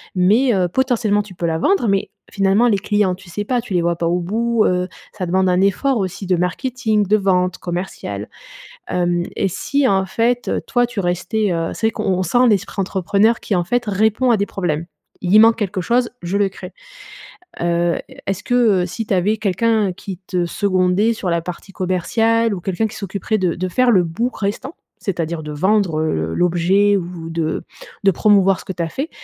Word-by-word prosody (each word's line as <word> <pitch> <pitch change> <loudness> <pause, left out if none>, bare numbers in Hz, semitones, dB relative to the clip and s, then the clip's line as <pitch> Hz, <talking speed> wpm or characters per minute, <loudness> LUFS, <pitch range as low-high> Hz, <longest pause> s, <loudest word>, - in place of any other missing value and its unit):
mais, 215 +8 +3
heu 185 -3 +2
-potentiellement 220 -1 +1
tu 200 - -13
peux 170 - -4
la 160 -1 0
vendre- 380 - +2
mais 195 0 +1 0.2
finalement 200 +4 +2
les 210 -4 +3
clients 205 -2 +1
tu 185 0 -16
sais 205 +5 -4
pas, 245 +1 0
tu 225 -5 -7
les 175 - +2
vois 170 0 +1
pas 170 0 -1
au 175 +1 +1
bout, 225 +5 0
heu, 180 0 0 0.2
ça 195 -4 -4
demande 185 +2 +1
un 180 +1 +2
effort 235 +7 +2
aussi 195 0 -3
de 185 -1 +2
marketing, 215 +3 0
de 210 - +4
vente, 185 -3 +1
commercial. 175 - -5 0.6
Hem 175 -1 0
et 195 - +1
si 265 - 0
en 190 -3 +2
fait, 235 +5 0
heu, - - -1
toi 245 0 +2
tu 235 - -9
restais, 190 +4 0
heu 165 -1 -2
c'est 225 - +1
vrai - - -1
qu'on - - -4
on 185 -1 +1
sent 245 +7 +3
l'esprit 200 -1 0
entrepreneur 200 +4 +1
qui 205 - -2
en 175 -1 +1
fait 245 +7 0
répond 220 +5 +1
à 230 - +4
des 200 - 0
problèmes. 170 -4 -2 0.4
Il 185 +4 +4
manque 225 +1 +6
quelque 195 -3 -2
chose, 240 +5 +1
je 180 +4 -1
le 200 -1 +2
crée. 190 - -10 0.9
Heu, 170 0 +1 0.3
est-ce 195 0 -2
que, 245 - -3 0.3
heu, - - -1
si 225 +5 -5
tu 210 - -1
avais 195 +4 +2
quelqu'un 215 0 +1
qui 185 +1 -8
te 180 -2 -1
secondait 185 +3 +1
sur 210 -5 -3
la 170 0 +1
partie 180 +3 -8
commerciale 225 +5 +1
ou 180 - -7
quelqu'un 195 +5 -1
qui - - -11
s'occuperait 200 +2 -2
de 180 -4 0
de 185 +1 -3
faire 250 +7 +2
le 185 -5 +4
bout 195 +10 -1
restant, 215 +9 -4 0.2
c'est-à-dire 170 -5 -3
de 150 - -6
vendre, 185 +1 +1
heu, 155 - 0
le 80 +1 -2
l'objet 180 +4 +3
ou 175 -3 -5
de 165 -1 -2 0.4
de 195 - +6
promouvoir 195 -1 +3
ce - - -17
que - - -4
tu 175 - -5
as 165 - 0
fait, 280 - -4
195 Hz, 210 wpm, -19 LUFS, 175-220 Hz, 0.9 s, manque